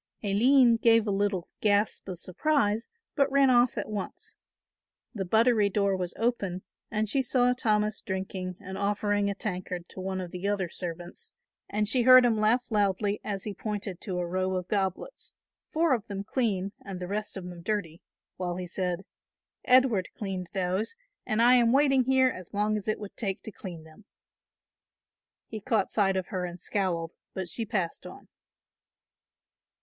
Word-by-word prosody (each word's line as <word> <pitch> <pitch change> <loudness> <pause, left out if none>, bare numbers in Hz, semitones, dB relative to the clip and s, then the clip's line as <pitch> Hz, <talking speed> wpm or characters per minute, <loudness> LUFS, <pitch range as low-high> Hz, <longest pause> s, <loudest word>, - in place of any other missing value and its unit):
Aline 235 +4 +5
gave 230 -1 +4
a 205 - 0
little 195 -2 0
gasp 205 -1 +1
of 180 - -3
surprise, 220 - 0 0.3
but 275 -2 +2
ran 275 -1 +5
off 245 0 +4
at - - -2
once. 205 -3 -5 0.8
The 195 -4 -3
buttery 220 +1 +4
door 200 -1 +1
was 180 -2 -3
open 200 -6 -1 0.3
and 215 -1 -1
she 270 +6 +1
saw 250 -1 +3
Thomas 215 -3 +1
drinking 190 -1 -4
and 190 -1 -7
offering 205 0 +1
a 200 - -2
tankard 180 -3 -4
to - - -10
one 190 0 -3
of 180 -2 -5
the 180 +2 -4
other 200 -3 0
servants, 175 0 -6 0.4
and 210 +1 0
she 245 +4 +3
heard 255 +1 +8
him 235 -2 +3
laugh 235 +4 +3
loudly 205 0 +1
as 200 -2 -3
he 210 - -4
pointed 205 -2 -5
to 185 -4 -3
a 175 - -1
row 185 +2 -1
of 180 -1 -3
goblets, 195 - -2 0.4
four 320 -2 +2
of 230 -3 -2
them 200 -1 -4
clean 200 -5 -1
and 195 -2 -6
the 180 - -5
rest 210 +1 -3
of 190 - -6
them 175 -1 -9
dirty, 180 -4 -3 0.4
while 180 -1 -2
he 180 0 -4
said, 180 +1 -3 0.6
"Edward 250 -7 +4
cleaned 190 -4 -4
those, 190 - -1 0.3
and 220 +2 +2
I 245 +1 +7
am 235 -1 +4
waiting 270 -1 +4
here 260 0 +4
as 185 -4 -8
long 210 +1 +1
as 210 -1 -4
it 215 - +1
would 205 -2 -8
take 195 -4 -3
to 220 - -7
clean 175 -6 -8
them." 160 +6 -17 1.4
He 220 -1 -7
caught 215 -3 0
sight 195 -3 +2
of 185 - -3
her 185 -2 -2
and 175 0 -5
scowled, 175 -5 -1 0.2
but 190 -2 -3
she 225 +5 -4
passed 190 -7 -2
on. - - -13
205 Hz, 175 wpm, -28 LUFS, 185-225 Hz, 1.4 s, heard